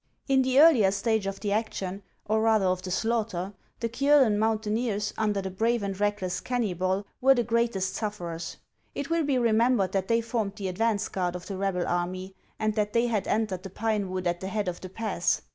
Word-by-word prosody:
In 270 -1 +4
the 260 +1 +3
earlier 285 -11 +7
stage 200 +1 0
of 195 0 -5
the 205 -1 -1
action, 200 -3 -2 0.2
or 220 +1 +1
rather 220 -3 +3
of 185 0 +1
the 185 - -6
slaughter, 210 -2 -1 0.3
the 230 - +1
Kiolen 260 -3 +4
mountaineers, 215 -1 0
under 210 -3 0
the 190 - -4
brave 225 +4 0
and 195 -1 -3
reckless 205 -3 -1
Keunybol, 195 -5 -1 0.2
were 270 +1 +6
the 240 - +1
greatest 230 -4 0
sufferers. 175 -6 -4 0.4
It 280 +3 -4
will 335 -1 +2
be 280 -3 +1
remembered 230 -4 +3
that 190 -1 -1
they 230 0 +2
formed 225 -3 -2
the 195 -2 -3
advance 210 +2 0
guard 180 -2 -2
of 180 - -7
the 195 - -5
rebel 190 -2 -1
army, 185 +2 -2 0.2
and 215 -1 0
that 210 -1 -1
they 235 +1 +3
had 220 -5 -1
entered 210 -4 0
the 195 - -8
pine 210 0 -1
wood 185 0 -3
at 175 0 0
the 190 - -5
head 210 0 -2
of 175 -1 -4
the 185 - -7
pass. 195 -3 -1
210 Hz, 205 wpm, -27 LUFS, 190-230 Hz, 0.4 s, earlier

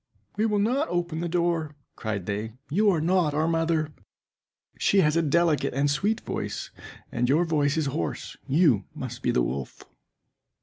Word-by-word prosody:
"We 215 +2 +2
will 210 -1 +1
not 250 +9 +1
open 175 -2 -1
the 170 0 -2
door," 170 -3 0 0.2
cried 105 -5 -3
they; 105 +3 -3 0.2
"you 205 +6 +4
are 175 -5 +2
not 165 -2 +2
our 155 +2 +2
mother, 165 -2 0 0.9
she 195 - +4
has 150 -1 +2
a 165 - +4
delicate 160 -3 +2
and 140 +1 +2
sweet 205 +10 0
voice, - - -4 0.4
and 120 +1 0
your 160 +6 +4
voice 150 -2 +1
is 160 - +1
hoarse; 130 -12 -3
you 135 - +3
must - - -6
be - - 0
the 60 - +2
wolf." 65 +1 -4
160 Hz, 170 wpm, -26 LUFS, 140-175 Hz, 0.9 s, you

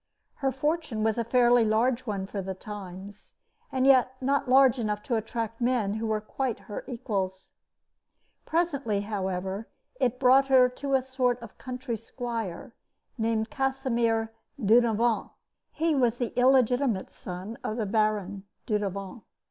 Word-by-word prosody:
Her 270 -2 0
fortune 295 -4 -1
was 220 +1 +1
a - - +1
fairly 240 0 +4
large 235 +3 +1
one 200 -3 -2
for 200 0 -4
the 190 0 -5
times, 200 0 -9 0.4
and 260 0 +1
yet 260 -2 +5
not 275 0 0
large 265 -1 +6
enough 210 -2 -2
to 240 - -1
attract 225 +1 -3
men 235 -5 +1
who 220 +1 -2
were 215 -1 0
quite 240 +3 -3
her 205 - -7
equals. 195 -6 -3 0.9
Presently, 280 -11 0
however, 195 0 -3 0.3
it 250 0 +1
brought 265 +1 +5
to 260 +1 +3
her 275 - +3
a 265 - +3
sort 255 -2 0
of 230 -4 -12
country 250 -1 -4
squire, 230 -4 -5 0.5
named 220 +1 0
Casimir 240 -5 0 0.3
Dudevant. 230 0 +3 0.4
He 325 0 +1
was 245 -4 +2
the 240 -2 -3
illegitimate 250 -4 +3
son 185 +5 -7
of 215 - -3
the 220 - -1
Baron 205 -2 0 0.2
Dudevant. 200 -1 -3
230 Hz, 140 wpm, -27 LUFS, 210-255 Hz, 0.9 s, large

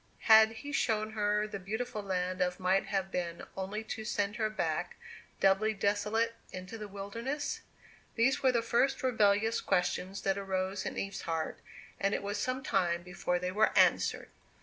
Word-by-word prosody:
Had 220 -1 +8
He 285 +6 -7
shown 220 -5 0
her 210 -1 +1
the 205 -2 -6
beautiful 215 +3 -4
land 185 -1 -2
of 180 0 0
Might 190 +1 +2
have 190 -1 -1
been 170 -1 -3
only 195 +3 -4
to 220 0 -5
send 205 -2 -1
her 215 -2 +1
back, 175 -4 -2 0.4
doubly 205 +3 +3
desolate, 210 +3 +1 0.2
into 185 +4 -7
the 215 -2 -6
wilderness? 230 +9 -4 0.5
These 260 +5 +2
were 260 - +4
the 235 -2 +1
first 240 +4 +1
rebellious 220 -2 +3
questions 185 +2 -1
that 195 0 +1
arose 190 0 -2
in - - -5
Eve's 195 0 -3
heart, 165 -1 -3 0.4
and 200 +1 +1
it - - -3
was 205 +1 -2
some 255 +3 -2
time 170 -6 +1
before 180 0 -1
they 180 +1 -2
were 215 +3 +2
answered. - - +3
205 Hz, 170 wpm, -32 LUFS, 185-220 Hz, 0.5 s, Had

